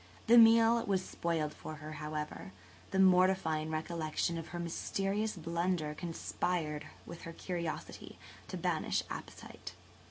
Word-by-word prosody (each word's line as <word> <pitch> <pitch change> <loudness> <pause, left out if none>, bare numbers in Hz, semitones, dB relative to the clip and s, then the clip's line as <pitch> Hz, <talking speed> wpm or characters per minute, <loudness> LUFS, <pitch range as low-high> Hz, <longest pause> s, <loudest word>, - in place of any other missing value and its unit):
The 235 - +6
meal 230 +1 +7
was 190 -2 +1
spoiled 160 -3 -1
for 155 - -8
her, 155 0 -8
however; 150 -10 -5 0.4
the - - -2
mortifying 185 -4 +4
recollection 160 +1 -1
of 165 0 -5
her 175 - -6
mysterious 195 +5 -1
blunder 170 -1 -1
conspired 165 -1 -2 0.2
with 170 - -9
her 165 - -7
curiosity 170 -2 -5 0.3
to - - -5
banish - - 0
appetite. - - -8
170 Hz, 125 wpm, -33 LUFS, 155-185 Hz, 0.4 s, meal